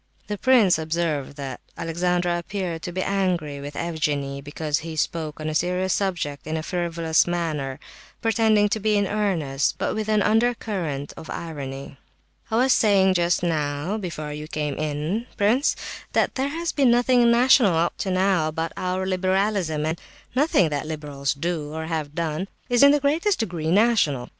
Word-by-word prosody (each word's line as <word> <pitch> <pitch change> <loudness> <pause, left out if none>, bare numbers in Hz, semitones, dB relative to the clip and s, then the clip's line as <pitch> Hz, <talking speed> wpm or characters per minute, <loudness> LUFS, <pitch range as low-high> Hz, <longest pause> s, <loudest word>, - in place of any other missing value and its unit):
The 210 - -4
prince 230 -10 +4
observed 160 -3 -2
that 135 -3 -6 0.2
Alexandra 175 +1 0
appeared 175 -2 -4
to 175 - -5
be 185 +1 -2
angry 175 -8 -1
with 145 +1 -7
Evgenie, 145 -4 -2
because 145 +1 -2
he 160 0 -7
spoke 155 -1 -2
on 155 - -4
a 155 - -2
serious 180 +3 0
subject 165 -8 -2
in 160 +1 -2
a 155 - -4
frivolous 170 -2 +1
manner, 155 -6 -2 0.4
pretending 220 -2 +3
to 220 +1 0
be 215 0 +2
in 205 - +2
earnest, 175 -10 0
but - - -1
with 215 0 -3
an 215 -2 +3
under 230 +3 +3
current 165 -11 -4
of 160 - -10
irony. 140 -4 -6 0.5
"I 220 - -1
was 255 +3 +4
saying 195 -3 +4
just 175 0 +1
now, 155 +4 -1
before 155 -6 -5
you 150 +1 -7
came 150 -2 -2
in, 155 - -2
prince, 230 +8 +2 0.4
that - - +2
there 270 +1 -1
has 330 +3 -2
been 275 -4 +3
nothing 240 0 +4
national 235 -5 +5
up 170 +1 +1
to 195 - -2
now, 185 -3 +2
about 160 +1 -3
our 185 +1 -2
liberalism, 185 -4 0
and 160 +2 -2 0.3
nothing 260 - +3
the 145 -1 -2
liberals 145 -3 -3
do, 155 0 -3
or 160 0 -4
have 155 -3 -3
done, 165 +2 -2 0.2
is 245 -1 +3
in 280 - +9
the 290 0 +3
least 330 +8 +2
degree 170 -8 -2
national. 185 - +2
175 Hz, 170 wpm, -24 LUFS, 155-205 Hz, 0.5 s, in